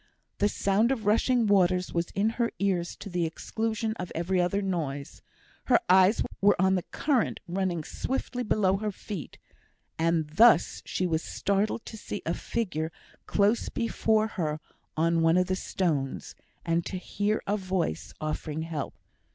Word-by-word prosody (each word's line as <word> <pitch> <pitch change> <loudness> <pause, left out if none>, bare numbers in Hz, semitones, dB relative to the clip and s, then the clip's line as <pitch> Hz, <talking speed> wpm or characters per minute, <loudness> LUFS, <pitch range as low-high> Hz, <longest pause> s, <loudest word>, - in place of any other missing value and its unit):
The 205 - +3
sound 205 +5 +2
of 230 -6 -2
rushing 230 +3 +3
waters 185 -3 +3
was 170 0 0
in 210 +3 +2
her 235 - +1
ears 185 -3 0
to - - -9
the 180 -2 -1
exclusion 220 +6 -2
of 180 - -5
every 180 +2 +1
other 180 +3 +1
noise; 155 -8 -3 0.4
her - - +5
eyes 190 +3 +5 0.2
were 200 -1 +4
on 190 +1 +4
the 185 - +1
current 265 - 0
running 175 -2 -1
swiftly 255 - -3
below 205 -4 +2
her 210 +1 -2
feet; 195 -4 -7 0.6
and 165 -1 +2
thus 175 +4 +5
she 185 - -1
was 160 -2 0
startled 200 +5 -1
to 220 - -8
see 205 - -6
a 165 - 0
figure 175 -7 -2 0.4
close 210 +3 +2
before 220 -1 +1
her 160 -8 -2 0.4
on 165 +1 +2
one 165 +1 +4
of 180 - +3
the 185 +1 0
stones, 145 - -2 0.3
and 165 0 +1
to 190 - -4
hear 205 +3 -1
a 205 - +1
voice 185 - -2
offering 155 0 -3
help. 160 -4 -4
190 Hz, 160 wpm, -28 LUFS, 165-210 Hz, 0.6 s, her